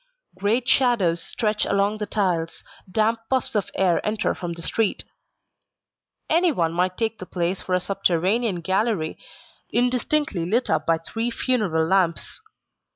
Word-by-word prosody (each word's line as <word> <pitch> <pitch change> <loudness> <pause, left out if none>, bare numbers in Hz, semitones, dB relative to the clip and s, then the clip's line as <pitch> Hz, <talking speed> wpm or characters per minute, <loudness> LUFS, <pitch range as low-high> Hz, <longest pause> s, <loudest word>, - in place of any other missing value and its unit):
Great 215 +6 0
shadows 205 -12 +3
stretch 210 +2 0
along 200 +2 +1
the 210 - -3
tiles, 175 -5 -1 0.3
damp 220 +3 +1
puffs 260 -1 0
of 210 -3 -1
air 185 -3 +2
enter 215 0 0
from 175 -1 -5
the 170 - -9
street. 220 +4 0 1.2
Anyone 310 - +2
might 180 +1 0
take 225 -1 -1
the 185 - -8
place 180 +1 -2
for 185 - -1
a - - +2
subterranean 195 +2 0
gallery 190 -2 0 0.5
indistinctly 250 - +1
lit 225 +9 0
up 155 0 0
by 165 0 +3
three 225 +8 -3
funeral 210 -10 0
lamps. 180 -1 0
195 Hz, 140 wpm, -23 LUFS, 175-230 Hz, 1.2 s, shadows